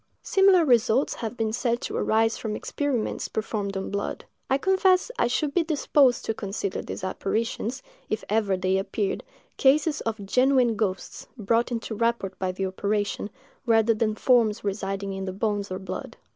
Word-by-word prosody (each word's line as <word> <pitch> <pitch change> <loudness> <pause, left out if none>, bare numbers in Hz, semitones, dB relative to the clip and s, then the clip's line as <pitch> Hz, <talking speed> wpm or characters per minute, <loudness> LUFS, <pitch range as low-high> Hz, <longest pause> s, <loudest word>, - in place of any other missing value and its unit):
Similar 385 -3 +5
results 245 0 +3
have 230 +1 -5
been 220 -1 -1
said 235 0 0
to - - -4
arise 225 +1 +2
from 215 -2 -4
experiments 275 -4 -2
performed 205 -2 -3
on 195 - -4
blood. 200 0 -3 0.2
I 270 - +3
confess 380 +5 +3
I - - +3
should 280 +4 -1
be 355 - +3
disposed 290 -5 +2
to 225 - 0
consider 200 -2 -3
these - - -7
apparitions, 225 +6 -2 0.3
if 215 - -2
ever 205 -3 +1
they 185 +1 +1
appeared, 195 +1 -2 0.3
cases 295 +3 +3
of 220 -3 -4
genuine 255 +1 +3
ghosts, 200 -3 -3
brought 230 +3 +1
into 230 -1 -3
rapport 230 -3 0
by 185 -1 -1
the 190 +1 -3
operation, 205 +2 -2 0.4
rather 225 0 +4
than 215 -1 0
forms 230 -3 +3
residing 195 -1 -3
in 190 0 -4
the 185 - -4
bones 205 0 -1
or 185 - -3
blood. 190 0 -7
220 Hz, 165 wpm, -26 LUFS, 200-250 Hz, 0.4 s, Similar